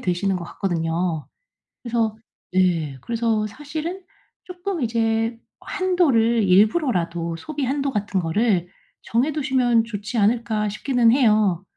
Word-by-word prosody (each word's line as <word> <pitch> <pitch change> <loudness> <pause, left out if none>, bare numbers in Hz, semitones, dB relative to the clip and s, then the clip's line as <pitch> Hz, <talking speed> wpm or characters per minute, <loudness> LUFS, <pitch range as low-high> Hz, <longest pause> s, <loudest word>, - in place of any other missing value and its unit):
되시는 185 +1 0
것 175 - -5
같거든요. 165 -3 -2 0.6
그래서 230 -2 0 0.4
네 165 -7 +1
그래서 225 -2 0
사실은 310 - -6 0.4
쪼끔 365 -2 -5
'이제 225 0 0 0.2
한도를 270 - +2
일부러라도 180 - +2
소비 295 - -5
한도 275 +1 -1
같은 205 -3 -1
거를 180 +1 +1 0.3
정해 250 +7 +1
두시면 255 -5 +2
좋지 210 +1 -5
않을까?' 215 0 +1
싶기는 235 +2 +2
해요. 215 - +3
225 Hz, 270 characters per minute, -22 LUFS, 185-255 Hz, 0.6 s, 해요